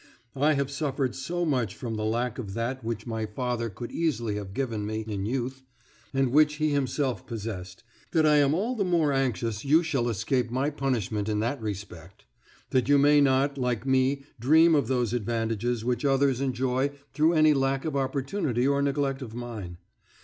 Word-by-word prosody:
I 145 Hz, +3 st, +3 dB
have 140 Hz, -1 st, -1 dB
suffered 140 Hz, -3 st, -1 dB
so 175 Hz, +6 st, -2 dB
much 125 Hz, -, 0 dB
from 115 Hz, -3 st, -5 dB
the 110 Hz, -1 st, -3 dB
lack 120 Hz, +3 st, -1 dB
of 100 Hz, -5 st, -6 dB
that 120 Hz, +3 st, -3 dB
which 110 Hz, -1 st, -4 dB
my 110 Hz, -2 st, -3 dB
father 115 Hz, +1 st, -2 dB
could 120 Hz, +4 st, -8 dB
easily 120 Hz, -10 st, -1 dB
have 100 Hz, -2 st, -6 dB
given 115 Hz, -6 st, -2 dB
me 110 Hz, +1 st, -3 dB
in 100 Hz, -2 st, -3 dB
youth, 130 Hz, +2 st, -3 dB, 0.5 s
and 135 Hz, -2 st, +1 dB
which 150 Hz, +1 st, +4 dB
he 155 Hz, 0 st, 0 dB
himself 135 Hz, -, -1 dB
possessed, 105 Hz, -6 st, -6 dB, 0.3 s
that 160 Hz, -2 st, +2 dB
I 150 Hz, -1 st, +5 dB
am 145 Hz, +1 st, +4 dB
all 225 Hz, +8 st, -1 dB
the 210 Hz, -, 0 dB
more 170 Hz, -6 st, +2 dB
anxious 115 Hz, -5 st, -1 dB
you 155 Hz, +5 st, +4 dB
shall 135 Hz, -7 st, 0 dB
escape 120 Hz, +3 st, 0 dB
my 130 Hz, +5 st, 0 dB
punishment 115 Hz, -7 st, -1 dB
in 105 Hz, -1 st, 0 dB
that 120 Hz, +3 st, -2 dB
respect; 100 Hz, -4 st, -7 dB, 0.5 s
that 130 Hz, 0 st, +1 dB
you 145 Hz, -, +6 dB
may 145 Hz, +1 st, +5 dB
not, 135 Hz, +1 st, +2 dB
like 125 Hz, -2 st, -1 dB
me, 135 Hz, +1 st, +2 dB, 0.2 s
dream 160 Hz, +7 st, +5 dB
of 140 Hz, -6 st, +2 dB
those 125 Hz, -3 st, 0 dB
advantages 115 Hz, 0 st, -1 dB
which 125 Hz, -1 st, -1 dB
others 135 Hz, -2 st, +2 dB
enjoy 130 Hz, 0 st, 0 dB, 0.2 s
through 155 Hz, +2 st, +3 dB
any 155 Hz, -1 st, +5 dB
lack 135 Hz, 0 st, 0 dB
of 155 Hz, -3 st, -2 dB
opportunity 135 Hz, -, 0 dB
or 140 Hz, 0 st, +2 dB
neglect 140 Hz, -1 st, 0 dB
of 115 Hz, -3 st, -7 dB
mine. 110 Hz, -8 st, -6 dB
130 Hz, 185 wpm, -27 LUFS, 115-140 Hz, 0.5 s, you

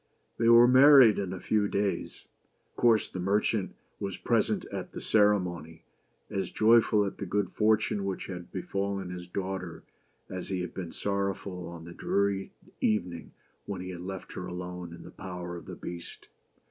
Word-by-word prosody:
They 115 Hz, 0 st, +4 dB
were 120 Hz, +1 st, +8 dB
married 130 Hz, -4 st, +8 dB
in 95 Hz, -3 st, -3 dB
a 95 Hz, -, -5 dB
few 105 Hz, +2 st, +1 dB
days. 100 Hz, 0 st, -2 dB, 0.5 s
Of -, -, -43 dB
course 115 Hz, -3 st, +3 dB
the 95 Hz, -, -7 dB
merchant 100 Hz, +2 st, 0 dB, 0.2 s
was 100 Hz, -1 st, -4 dB
present -, -, +1 dB
at -, -, -5 dB
the -, -, -5 dB
ceremony, 90 Hz, -6 st, +1 dB, 0.4 s
as 95 Hz, -, -3 dB
joyful 110 Hz, -1 st, +4 dB
at 100 Hz, -, -5 dB
the 100 Hz, -, -4 dB
good 100 Hz, 0 st, 0 dB
fortune 105 Hz, -2 st, +2 dB
which 95 Hz, -1 st, -3 dB
had 90 Hz, -2 st, -8 dB
befallen 100 Hz, 0 st, -3 dB
his 90 Hz, -1 st, -7 dB
daughter 95 Hz, -3 st, -5 dB, 0.4 s
as 90 Hz, -1 st, -6 dB
he 95 Hz, -2 st, -2 dB
had 90 Hz, -, -5 dB
been 90 Hz, -3 st, -6 dB
sorrowful 100 Hz, -2 st, -3 dB
on 85 Hz, -1 st, -9 dB
the 85 Hz, -, -9 dB
dreary 100 Hz, +1 st, 0 dB, 0.3 s
evening 90 Hz, -6 st, -1 dB, 0.3 s
when 100 Hz, -2 st, -4 dB
he 90 Hz, 0 st, -6 dB
had 90 Hz, -1 st, -7 dB
left 95 Hz, +1 st, -7 dB
her 90 Hz, -, -5 dB
alone 90 Hz, -1 st, -6 dB
in 85 Hz, -, -10 dB
the -, -, -11 dB
power 90 Hz, -2 st, -7 dB
of 85 Hz, -, -9 dB
the -, -, -7 dB
Beast. 85 Hz, -1 st, -9 dB
95 Hz, 170 wpm, -29 LUFS, 90-105 Hz, 0.5 s, were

